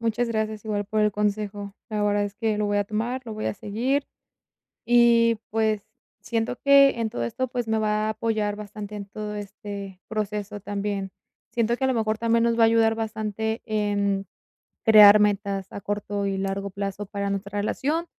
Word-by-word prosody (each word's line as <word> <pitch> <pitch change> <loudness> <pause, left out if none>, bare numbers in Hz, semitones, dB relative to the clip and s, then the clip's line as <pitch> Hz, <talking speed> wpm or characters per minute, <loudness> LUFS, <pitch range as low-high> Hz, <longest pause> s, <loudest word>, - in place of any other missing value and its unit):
Muchas 230 +1 0
gracias, 220 -1 -2
igual 205 -1 -1
por 215 +2 -1
el 210 -1 +3
consejo. 205 -1 -2
La 210 -2 -1
verdad 205 0 +2
es 205 0 -5
que 220 0 -1
lo 210 - +1
voy 205 0 +1
a 205 - +1
tomar, 230 +5 -2
lo 225 - -6
voy 215 0 -4
a - - -1
seguir 245 +8 -1 0.8
y, 235 -1 +5
pues, 215 -2 0 0.4
siento 230 +1 -2
que 280 0 +7
en 225 -1 0
todo 120 - -3
esto, 260 - -2
pues, 245 -1 -3
me 220 0 +1
va 215 0 +1
a - - 0
apoyar 215 -2 -1
bastante 210 0 -8
en 205 -1 -6
todo 210 +1 -6
este 200 -2 -7
proceso 210 -1 -3
también. 200 -1 -3 0.4
Siento 235 0 +1
que 265 - -5
a 265 - +3
lo 260 - +2
mejor 220 -2 0
también 230 0 +2
nos 235 0 +2
va 230 - +5
a - - +8
ayudar 225 0 +3
bastante 220 0 -3
en 205 -3 0 0.6
crear 215 -2 +9
metas 200 -2 0
a - - -6
corto 205 0 -3
y 195 -1 -1
largo 195 +1 -2
plazo 200 +1 -4
para 200 0 -3
nuestra 200 +1 -3
relación. 295 +10 -1
210 Hz, 190 wpm, -25 LUFS, 205-225 Hz, 0.8 s, crear